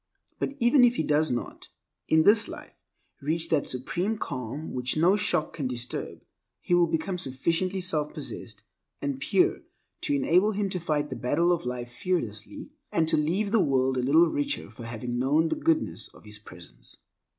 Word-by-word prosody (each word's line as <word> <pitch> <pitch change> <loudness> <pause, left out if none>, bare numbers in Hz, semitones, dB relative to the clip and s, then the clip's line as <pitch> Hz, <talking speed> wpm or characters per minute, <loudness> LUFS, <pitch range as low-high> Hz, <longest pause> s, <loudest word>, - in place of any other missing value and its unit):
But 280 - -3
even 245 +3 +5
if 245 0 +5
he - - 0
does 150 +1 +2
not, 120 -2 -4 0.4
in 160 0 +4
this 210 +3 +5
life, - - -9 0.5
reach 165 +3 -2
that 155 -3 +1
supreme 175 - -1
calm 140 - -5
which 125 +2 -1
no 175 +5 +5
shock 160 -6 0
can 140 -5 -2
disturb, 125 -1 -5 0.4
he - - -2
will 175 -1 +5
become 165 +3 -2
sufficiently 170 +8 -1
self 155 -5 -1
possessed - - -8 0.4
and 140 -2 -3
pure - - +2 0.4
to - - 0
enable 180 +9 +3
him 200 0 -1
to 180 - -1
fight 150 -3 -1
the - - -3
battle 155 +8 +1
of 170 -8 0
life 120 -1 -4
fearlessly, 120 - -3 0.2
and 160 -1 +2
to - - +4
leave 180 +7 0
the 225 - +4
world 130 -5 +2
a 125 - 0
little 155 +7 +5
richer 285 - -2
for 120 - -10
having 120 +1 -4
known 150 +5 +2
the - - 0
goodness 315 0 0
of - - -16
his 105 0 -7
presence. 90 -4 -13
155 Hz, 180 wpm, -27 LUFS, 130-185 Hz, 0.5 s, even